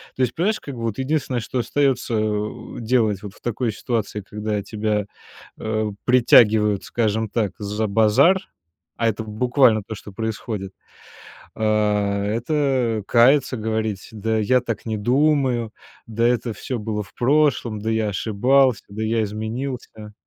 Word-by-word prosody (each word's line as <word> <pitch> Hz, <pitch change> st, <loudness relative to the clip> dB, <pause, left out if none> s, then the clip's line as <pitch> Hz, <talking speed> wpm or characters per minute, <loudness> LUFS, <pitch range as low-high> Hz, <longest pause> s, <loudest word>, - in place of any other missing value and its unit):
То -, -, -3 dB
есть, 120 Hz, -1 st, -1 dB
понимаешь, 210 Hz, +6 st, 0 dB
как 140 Hz, -, -8 dB
бы 115 Hz, -, -7 dB
вот 115 Hz, -3 st, -2 dB
единственное, 135 Hz, -2 st, -1 dB
что 110 Hz, -, -4 dB
остается, 135 Hz, -1 st, 0 dB
э, -, -, +2 dB
у 105 Hz, 0 st, -4 dB
делать 110 Hz, -4 st, +1 dB
вот 100 Hz, -2 st, -8 dB
в -, -, -21 dB
такой 120 Hz, 0 st, -1 dB
ситуации, 110 Hz, -1 st, -3 dB
когда 105 Hz, 0 st, -3 dB
тебя, 105 Hz, 0 st, -1 dB, 0.5 s
э, 110 Hz, -1 st, -1 dB
притягивают, 110 Hz, -4 st, +5 dB
скажем 110 Hz, -1 st, -1 dB
так, 105 Hz, -2 st, -1 dB
за 105 Hz, +1 st, -2 dB
базар, 110 Hz, -, +4 dB, 0.6 s
а 115 Hz, -, +1 dB
это 110 Hz, 0 st, -3 dB
в 110 Hz, -, -10 dB
буквально 120 Hz, 0 st, +3 dB
то, 110 Hz, -, -7 dB
что 105 Hz, -, -11 dB
происходит, 110 Hz, -2 st, -4 dB, 0.8 s
а, 105 Hz, -2 st, +1 dB
это 120 Hz, 0 st, 0 dB
каяться, 130 Hz, +3 st, +4 dB
говорить: 110 Hz, -2 st, -2 dB
"Да 110 Hz, +1 st, -1 dB
я 125 Hz, +4 st, +3 dB
так 115 Hz, -4 st, -5 dB
не 110 Hz, -1 st, -1 dB
думаю, 130 Hz, -1 st, +1 dB, 0.3 s
да 115 Hz, +1 st, 0 dB
это 120 Hz, -1 st, 0 dB
всё 130 Hz, +1 st, -4 dB
было 105 Hz, -1 st, -3 dB
в 95 Hz, -, -16 dB
прошлом, 130 Hz, -4 st, +2 dB
да 110 Hz, -, -4 dB
я 110 Hz, -1 st, 0 dB
ошибался, 125 Hz, +5 st, +2 dB
да 105 Hz, +2 st, -5 dB
я 110 Hz, +1 st, +1 dB
изменился". 110 Hz, +1 st, -5 dB
110 Hz, 155 wpm, -22 LUFS, 105-125 Hz, 0.8 s, притягивают